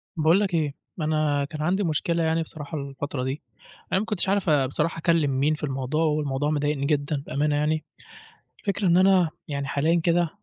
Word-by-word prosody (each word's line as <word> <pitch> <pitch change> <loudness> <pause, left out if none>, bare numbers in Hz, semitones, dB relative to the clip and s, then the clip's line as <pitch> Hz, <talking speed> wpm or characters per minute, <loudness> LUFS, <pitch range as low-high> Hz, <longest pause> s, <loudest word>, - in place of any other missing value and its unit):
باقول 160 +4 +4
لك 200 -3 -1
إيه، 155 -4 0 0.3
أنا 155 -2 +1
كان 150 +1 -7
عندي 185 +6 +1
مشكلة 165 0 0
يعني 160 +1 +1
بصراحة 155 0 -7
الفترة 140 -1 -4
دي، 135 +3 -3 0.5
أنا 190 - +3
ما 210 - -2
كنتش 210 -4 0
عارف 195 -3 +1
آآ 145 -3 +4
بصراحة 150 +5 -1
أكلّم 165 -3 +2
مين 150 +3 +2
في 150 - -13
الموضوع، 135 +2 -1
والموضوع 150 -2 0
مضايقني 145 -1 0
جدًا 145 -1 0
بأمانة 145 +2 0
يعني، 150 +1 0 0.8
الفكرة 200 0 -1
إن 170 -1 +5
أنا 185 -2 +5 0.2
يعني 140 -1 -3
حاليًا 160 +5 +1
كده 175 0 +3
155 Hz, 185 wpm, -25 LUFS, 145-170 Hz, 0.8 s, إن